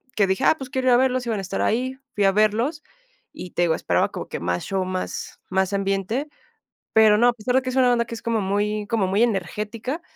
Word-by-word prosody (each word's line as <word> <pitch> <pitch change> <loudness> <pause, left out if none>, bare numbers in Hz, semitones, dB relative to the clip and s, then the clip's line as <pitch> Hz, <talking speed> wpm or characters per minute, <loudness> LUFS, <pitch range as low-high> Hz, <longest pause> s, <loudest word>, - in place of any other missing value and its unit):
que 205 - +3
dije: 190 0 0
"Ah, - - +5
pues 265 -3 -8
quiero 260 -1 -2
ir 250 - +6
a - - +6
verlos", 255 -1 +1
iban 225 -2 -1
a - - -3
estar 195 +1 -3
ahí, 255 +3 0 0.2
fui 205 - +1
a 195 - +5
verlos 215 +9 +1 0.5
y, 180 - -9
te - - -2
digo, 165 -2 +3
esperaba - - +1
como - - -6
que - - -5
más 90 +1 -2
show, 195 -1 -1
más 185 0 -5
más 190 0 +1
ambiente. 195 +7 -1 0.7
Pero 215 -1 +6
no, 240 +3 +4
a 245 - +4
pesar 245 +2 -2
de 265 - +4
que 255 - -3
es - - -6
una 255 -2 +4
banda 235 -1 +2
que 230 - -8
es - - -9
como 230 -1 0
muy 205 +2 -1
como 210 -3 0
muy 200 +5 +2
energética, 215 - -2
215 Hz, 250 wpm, -23 LUFS, 195-250 Hz, 0.7 s, ir